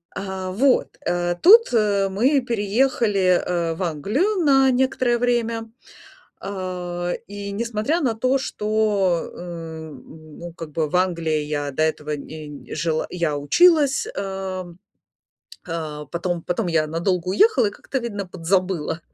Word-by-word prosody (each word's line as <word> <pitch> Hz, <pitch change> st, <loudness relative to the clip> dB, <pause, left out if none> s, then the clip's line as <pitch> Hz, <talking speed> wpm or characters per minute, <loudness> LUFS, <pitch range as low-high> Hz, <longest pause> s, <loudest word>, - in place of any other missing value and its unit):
Э, 190 Hz, -1 st, -4 dB
вот. 260 Hz, +7 st, +2 dB
Э, 175 Hz, 0 st, 0 dB
тут, 445 Hz, -, +7 dB
э, 200 Hz, -3 st, +2 dB
мы 260 Hz, +8 st, +2 dB
переехали, 210 Hz, -4 st, +1 dB
э, 170 Hz, -2 st, -1 dB
в 185 Hz, -, -4 dB
Англию 260 Hz, -, 0 dB
на 270 Hz, -2 st, +5 dB
некоторое 250 Hz, -1 st, +1 dB
время. 230 Hz, -2 st, 0 dB, 0.7 s
Э, 180 Hz, -2 st, -4 dB
и 200 Hz, 0 st, -6 dB
несмотря 230 Hz, +8 st, -1 dB
на 245 Hz, -5 st, +1 dB
то, 255 Hz, +4 st, +2 dB
что, 210 Hz, -7 st, 0 dB
м, 160 Hz, -3 st, -9 dB
ну, 170 Hz, -1 st, -8 dB
как 165 Hz, -3 st, -8 dB
бы 155 Hz, 0 st, -1 dB
в 180 Hz, -, -3 dB
Англии 165 Hz, -4 st, +1 dB
я 145 Hz, -1 st, -3 dB
до 155 Hz, +4 st, 0 dB
этого 150 Hz, -1 st, -1 dB
нь 150 Hz, 0 st, -9 dB
жила 160 Hz, 0 st, -1 dB
я 165 Hz, -5 st, -1 dB
училась. 290 Hz, -, +4 dB
Э, 190 Hz, -1 st, -4 dB, 1.0 s
э, 155 Hz, -3 st, -5 dB
потом 175 Hz, 0 st, -2 dB
потом 180 Hz, +3 st, -1 dB
я 160 Hz, -2 st, +2 dB
надолго 175 Hz, +2 st, -1 dB
уехала 250 Hz, -, +4 dB
и 205 Hz, -, -3 dB
как-то, 265 Hz, -, -5 dB
видно, 205 Hz, -5 st, -4 dB
подзабыла. 180 Hz, -2 st, -1 dB
185 Hz, 135 wpm, -22 LUFS, 165-230 Hz, 1.0 s, тут